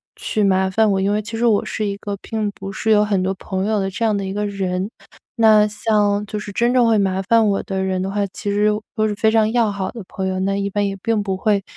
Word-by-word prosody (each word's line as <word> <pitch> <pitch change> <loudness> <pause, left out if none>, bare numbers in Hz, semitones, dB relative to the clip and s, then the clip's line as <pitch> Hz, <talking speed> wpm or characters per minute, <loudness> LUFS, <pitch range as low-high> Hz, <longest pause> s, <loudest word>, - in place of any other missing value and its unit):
去 215 - -2
麻 190 -1 +2
烦 215 +2 +2
我， 190 -1 +1
因 195 +1 +1
为 210 +1 +1
其 225 +2 -6
实 240 - +1
我 215 -3 +3
是 215 - -3
一 200 - -2
个 200 0 -5
并 215 -2 -3
不 195 -1 -8
是 220 - -3
有 210 -1 +5
很 200 -3 0
多 190 +1 0
朋 190 +1 -3
友 215 -1 +1
的 195 0 -1
这 210 +5 -4
样 215 -2 +2
的 200 - -2
一 190 - -4
个 210 +1 -2
人。 190 -1 -2 0.5
那 215 -2 +6
像 210 -1 +1
就 210 - -4
是 210 -1 -6
真 235 +4 +1
正 245 -2 +4
会 220 -2 +3
麻 190 -1 0
烦 225 +2 +3
我 195 - 0
的 190 -1 -3
人 190 -1 -1
的 195 - -3
话， 205 0 0
其 200 +2 -5
实 205 +1 +2 0.3
都 215 -1 +1
是 210 - -2
非 220 0 +2
常 220 -1 +3
要 230 -3 +2
好 195 -2 -3
的 225 -4 -8
朋 190 -1 -4
友， 185 0 -2
那 195 +1 0
一 200 0 -1
般 205 +1 0
也 195 - -3
并 225 -2 0
不 195 -2 -2
会 200 +1 +1
205 Hz, 300 characters per minute, -20 LUFS, 195-215 Hz, 0.5 s, 那